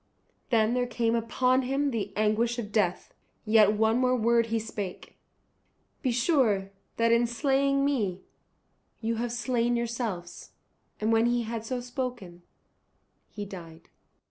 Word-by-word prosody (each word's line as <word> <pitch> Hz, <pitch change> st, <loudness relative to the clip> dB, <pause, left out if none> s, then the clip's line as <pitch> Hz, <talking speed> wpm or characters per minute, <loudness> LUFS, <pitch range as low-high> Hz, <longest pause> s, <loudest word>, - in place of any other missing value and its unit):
Then 225 Hz, -2 st, +3 dB
there 250 Hz, 0 st, 0 dB
came 230 Hz, -1 st, 0 dB
upon 250 Hz, +3 st, +2 dB
him 275 Hz, +2 st, 0 dB
the 205 Hz, -4 st, -3 dB
anguish 215 Hz, +3 st, +1 dB
of 210 Hz, -3 st, -5 dB
death. 195 Hz, -4 st, 0 dB, 0.3 s
Yet 215 Hz, -1 st, +5 dB
one 220 Hz, +2 st, +2 dB
more 255 Hz, 0 st, +3 dB
word 235 Hz, 0 st, +2 dB
he 230 Hz, 0 st, 0 dB
spake, 205 Hz, -4 st, -6 dB, 0.9 s
"Be 260 Hz, -, 0 dB
sure 235 Hz, -, +2 dB, 0.3 s
that 230 Hz, 0 st, +3 dB
in 235 Hz, +1 st, +4 dB
slaying 275 Hz, +3 st, +1 dB
me 205 Hz, -10 st, -1 dB, 0.8 s
you 230 Hz, 0 st, -2 dB
have 235 Hz, +1 st, -2 dB
slain 240 Hz, 0 st, 0 dB
yourselves." 230 Hz, -7 st, -4 dB, 0.5 s
And 215 Hz, +1 st, +1 dB
when 225 Hz, +1 st, +4 dB
he 240 Hz, 0 st, +1 dB
had 225 Hz, 0 st, -5 dB
so 255 Hz, 0 st, -2 dB
spoken 245 Hz, -8 st, -5 dB, 0.9 s
he 205 Hz, -1 st, -6 dB
died. 170 Hz, -4 st, -11 dB
230 Hz, 140 wpm, -28 LUFS, 215-245 Hz, 0.9 s, Yet